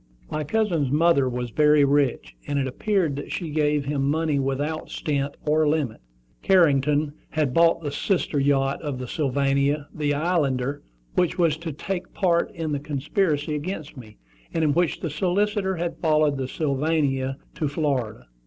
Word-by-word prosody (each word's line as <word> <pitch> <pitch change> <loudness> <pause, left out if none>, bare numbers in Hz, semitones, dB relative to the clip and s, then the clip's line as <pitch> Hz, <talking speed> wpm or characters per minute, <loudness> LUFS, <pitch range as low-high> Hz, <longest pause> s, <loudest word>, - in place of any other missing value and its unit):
My 155 - -1
cousin's 170 -5 0
mother 150 -2 +3
was 125 -1 -4
very 150 0 +5
rich, 140 -2 +1
and 145 -1 -1
it 140 - +1
appeared 165 +3 0
that 145 - -6
she 165 -4 -4
gave 150 -1 +1
him 140 -1 0
money 155 -1 +1
without 140 +4 -2
stint 140 -2 -2
or 155 +1 +3
limit. 145 -7 -1 0.4
Carrington 150 -5 +3 0.2
had 150 -5 0
bought 165 +1 +4
the 145 - -2
sister 150 -1 0
yacht 135 0 +1
of 145 -4 -3
the 125 0 -6
Sylvania, 140 +1 0
the 145 -2 0
Islander, 145 -4 0 0.3
which 180 - +1
was 165 -4 +3
to 165 0 -5
take 180 +5 -5
part 170 -3 +2
in 165 -2 -3
the 145 - -1
conspiracy 150 +2 -1
against 155 0 -5
me, 110 -5 -12 0.4
and 165 - +1
in 150 -2 +3
which 175 +1 0
the 165 - -2
solicitor 190 +4 0
had 170 0 -3
followed 155 -3 +3
the 130 -1 -2
Sylvania 140 -2 0 0.2
to 155 - -2
Florida. 140 - -2
150 Hz, 160 wpm, -24 LUFS, 140-165 Hz, 0.4 s, very